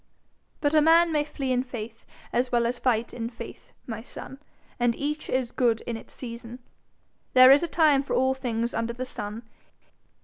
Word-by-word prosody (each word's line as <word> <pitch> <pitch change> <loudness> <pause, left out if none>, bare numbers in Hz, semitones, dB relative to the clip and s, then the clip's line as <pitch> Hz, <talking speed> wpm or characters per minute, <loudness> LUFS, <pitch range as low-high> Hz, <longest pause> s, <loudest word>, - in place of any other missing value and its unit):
But 290 0 +1
a 310 - +6
man 330 +2 +5
may 300 -2 +2
flee 280 -3 -4
in 250 0 +2
faith 230 -3 -8 0.3
as 250 +1 +1
well 240 -1 +2
as 240 +1 -2
fight 235 -2 0
in 230 -1 -4
faith, 235 - -10
my 225 -2 -5
son, 265 +2 -9 0.4
and 240 -1 +2
each 300 +2 -3
is 255 -2 0
good 235 -3 +1
in 235 - -4
its 225 - -10
season. 235 -1 -8 0.8
There 255 0 +9
is 280 - +7
a 340 - -1
time 305 -4 +4
for 275 - -3
all 260 +1 +3
things 240 -3 -2
under 230 +1 -2
the 255 +2 -5
sun. 210 -1 -6
250 Hz, 190 wpm, -26 LUFS, 235-275 Hz, 0.8 s, There